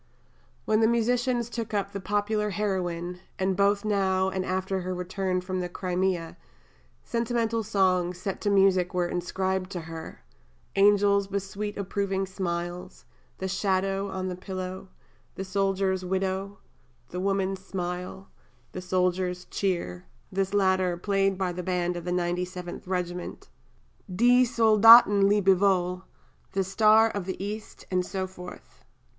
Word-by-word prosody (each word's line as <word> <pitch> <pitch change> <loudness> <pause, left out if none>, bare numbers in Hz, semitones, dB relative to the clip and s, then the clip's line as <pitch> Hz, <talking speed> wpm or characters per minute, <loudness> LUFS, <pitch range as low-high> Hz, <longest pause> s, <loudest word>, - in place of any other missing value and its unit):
Then 215 0 +2
the 220 - +4
musicians 240 +1 +1
took 230 -3 -4
up 200 -1 -1
the 200 - -5
Popular 210 +2 0
Heroine, 180 -4 -2 0.2
and 190 0 0
both 200 +2 +2
now, 190 -2 +1
and 190 0 -2
after 190 +1 -2
her 185 0 -3
return 185 0 -2
from 185 0 -3
the 180 -1 -3
Crimea, 180 -2 -2 0.7
sentimental 230 -1 -1
songs, 185 -4 +1
set 190 +1 -4
to 205 - 0
music, 190 -3 +3
were 175 -1 +1
inscribed 185 +1 -2
to 175 - -4
her: 160 0 -9 0.5
"Angels 200 0 +4
with 200 -1 -2
Sweet 205 +1 -5
Approving 195 0 -1
Smiles," 180 -1 -5 0.3
"The 190 - -3
Shadow 195 +1 0
on 190 -1 -3
the 180 - -3
Pillow," 185 0 -6 0.5
"The 190 - -4
Soldier's 190 -1 0
Widow," 190 +2 -2 0.5
"The 180 - -5
Woman's 195 0 -1
Smile," 180 0 -5 0.4
"The 185 - -6
Soldier's 180 0 0
Cheer" 170 - -2 0.3
this 195 0 -1
latter 185 -3 +2
"played 195 +1 +1
by 185 -1 -1
the 180 +1 -5
band 180 -1 -1
of 175 -1 -6
the 180 - -2
97th 180 0 -3
Regiment," 180 -1 -4 0.6
"Die 245 +7 +4
Soldaten 220 -3 +7
Lebewohl," 190 -2 +2 0.5
"The 195 - +1
Star 215 +3 +5
of 200 -3 -4
the 190 0 -4
East," 210 +1 -7
and 180 -1 +2
so 190 +1 -3
forth. 180 -1 -12
190 Hz, 140 wpm, -27 LUFS, 180-200 Hz, 0.7 s, Soldaten